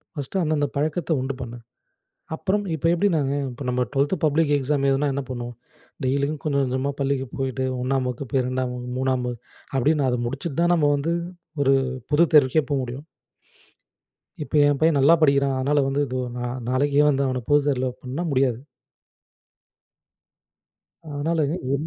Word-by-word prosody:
First 145 +6 -2
அந்தந்த 150 -2 +1
பழக்கத்த 155 +4 -1
உண்டு 130 +1 -2
பண்ணு. 120 -1 -6 0.8
அப்புறம் 200 +5 -1
இப்போ 160 +1 -2
எப்படி 200 +4 +2
நாங்க, 140 -3 0 0.2
இப்போ 125 +3 -8
நம்ம 125 0 +1
ட்வெல்த் 140 +5 +1
பப்ளிக் 155 0 +2
எக்ஸாம் 140 +1 0
எழுதினா 140 +2 +1
என்ன 140 - -2
பண்ணுவோம். 120 -1 -5 0.5
டெய்லியும் 140 +3 0
கொஞ்சம் 140 -2 +1
கொஞ்சமா 130 +2 -1
பள்ளிக்கு 135 -1 0
போயிட்டு 130 -1 -2 0.2
1 130 0 0
வகுப்பு, 125 +1 -5
2 130 0 -1
வகுப்பு, 125 0 -6
3 130 -1 0
வகுப்பு 120 -1 -5 0.3
அப்படின்னு, 145 +2 +2
அத 125 -1 0
முடிச்சிட்டு 135 +5 -4
தான் 175 +1 +3
நம்ம 150 -4 +3
வந்து 150 +4 -1 0.5
ஒரு 135 0 +4 0.4
பொது 155 +3 +6
தேர்வுக்கே 150 +1 +5
போ 145 - +2
முடியும். 130 +4 -7 1.4
இப்போ 150 - -5
என் 145 -1 +1
பையன் 160 -3 +4
நல்லா 140 +5 +6
படிக்கிறான் 140 -2 +3
அதனால 145 +3 +2
வந்து 140 +1 0
இது 130 - -3 0.2
நா 125 - -3 0.2
நாளைக்கே 140 +3 +3
வந்து 140 -1 +1
அவன 130 -1 -2
பொது 145 0 +6
தேர்வுல 130 -2 +1
பண்ண 130 +6 -4
முடியாது. 130 -3 +1 2.5
அதனால 160 +3 -1
இது. 140 -4 -2
140 Hz, 155 wpm, -23 LUFS, 130-150 Hz, 2.5 s, பொது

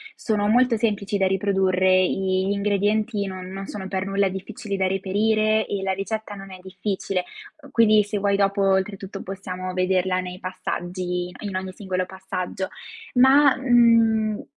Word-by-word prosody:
sono 210 -2 -1
molto 240 +1 +3
semplici 205 -2 -1
da 190 -1 +2
riprodurre, 190 -1 +2
gli 190 +1 0
ingredienti 205 +1 0
non 185 -1 -7
non 195 +1 -6
sono 190 -2 -6
per 190 0 -2
nulla 195 0 +1
difficili 200 +2 -5
da 190 -1 +1
reperire 215 +3 +1
e 200 -1 -3
la 190 0 0
ricetta 210 +2 -4
non 195 -1 -10
è 185 - -10
difficile. 190 0 -3 0.5
Quindi 215 -2 +5
se 205 +1 -3
vuoi 200 0 +1
dopo 200 0 +1
oltretutto 195 0 -1
possiamo 185 -1 -6
vederla 185 0 +1
nei 180 0 -6
passaggi 180 -1 -4
in 200 -3 -5
ogni 190 0 -3
singolo 185 -2 -3
passaggio, 190 0 -5 0.5
ma, 270 +2 +6
mhmm, 230 -4 +3
195 Hz, 150 wpm, -23 LUFS, 185-210 Hz, 0.5 s, ma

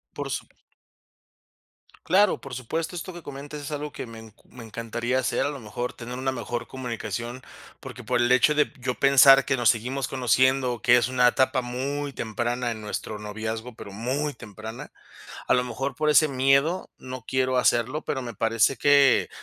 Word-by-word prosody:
Por - - -4
sup - - -4 1.6
Claro, 195 +3 +3
por 135 - -9
supuesto, 160 +8 -4
esto 180 +2 -6
que 175 - -9
comentas 145 +1 -8
es 145 - -7
algo 150 -1 -4
que 130 - -6
me 115 -1 -10
enc 110 -1 -14
me 125 -2 -12
encantaría 115 +3 -2
hacer, 130 - 0
a 145 - 0
lo 140 -4 -7
mejor 120 +3 -5
tener 125 +1 -7
una 130 0 -1
mejor 120 -2 -4
comunicación, 120 -1 -5 0.4
porque - - -10
por 125 -1 0
el 120 0 +2
hecho 130 +4 +4
de 150 - +1
yo 125 0 -2
pensar 135 0 +7
que 135 - +1
nos 120 -3 +3
seguimos 125 +4 -1
conociendo, 130 -1 +2
que 120 0 +6
es 120 -1 +2
una 125 -1 +4
etapa 130 +1 +1
muy 140 +4 -3
temprana 120 +1 -2
en 110 -1 -6
nuestro 105 0 -5
noviazgo, 110 +3 -5
pero 100 -3 -10
muy 135 +7 -2
temprana, 110 0 -9 0.6
a - - +3
lo 125 - +3
mejor 125 +3 -4
por 155 +3 0
ese 150 +1 +6
miedo 140 +5 +2
no 130 -1 -8
quiero 130 -1 +1
hacerlo, 125 +4 +1
pero 135 - -3
me 120 -1 -6
parece 115 +3 +1
que, 140 -3 +5
125 Hz, 180 wpm, -25 LUFS, 115-140 Hz, 1.6 s, pensar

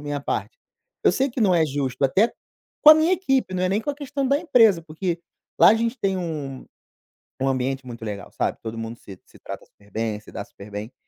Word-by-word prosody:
minha 145 -1 -4
parte". 320 - -3 0.5
Eu - - +6
sei 270 +1 +1
que 245 - -5
não 195 -5 +4
é 165 -2 +4
justo, 135 -2 -2
até 195 - +3 0.5
com 305 - +11
a - - +11
minha 315 +4 +3
equipe, 270 - +1
não 185 - -1
é 185 - +2
nem 200 +3 +1
com 290 - -2
a - - -5
questão 280 -1 -3
da 280 +2 +3
empresa, 230 - +4
porque 170 +2 -3 0.4
lá - - +8
a 220 - +5
gente 230 +2 -1
tem 195 -3 0
um 150 -7 -5 0.8
um 135 - +2
ambiente 135 0 -1
muito 115 -2 -8
legal, 105 -2 -6
sabe, - - -1
todo 115 0 -5
mundo 115 +1 -5
se 95 -2 -12
se - - -19
trata - - -8
super 100 0 -25
bem, 110 0 -2
se - - -15
dá - - -5
super 100 +1 -14
bem. 105 +4 -6
165 Hz, 235 wpm, -23 LUFS, -, 0.8 s, com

